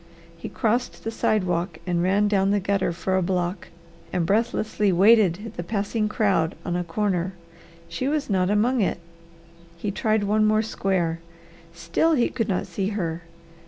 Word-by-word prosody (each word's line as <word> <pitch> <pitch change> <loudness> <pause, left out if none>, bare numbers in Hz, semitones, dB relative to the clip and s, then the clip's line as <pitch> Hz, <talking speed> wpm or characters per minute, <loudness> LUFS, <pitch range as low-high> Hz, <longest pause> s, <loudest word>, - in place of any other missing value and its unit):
He 165 - -8
crossed 235 +3 -1
the 225 - -3
sidewalk 180 -6 0
and 175 -2 0
ran 195 +3 +2
down 195 -1 +2
the 205 0 +2
gutter 195 -2 0
for 180 +2 -2
a - - +2
block 180 0 -2 0.4
and 175 -2 0
breathlessly 210 0 +1
waited 205 +1 +4
the 175 - -3
passing 210 +2 -1
crowd 195 -7 +1
on - - -2
the 175 0 -1
corner. 185 0 -1 0.5
She 260 - -3
was 300 0 0
not 185 -3 +1
among 230 +4 +2
it. 190 - 0 0.8
He 200 +4 -3
tried 215 +1 0
one 210 +2 +2
more 215 +1 +3
square. 185 -6 -1 0.6
Still 170 - +1
he 245 -6 +2
could 225 -2 -2
not 185 - 0
see 195 -1 -3
her. 170 -5 -3
200 Hz, 160 wpm, -24 LUFS, 175-215 Hz, 0.8 s, waited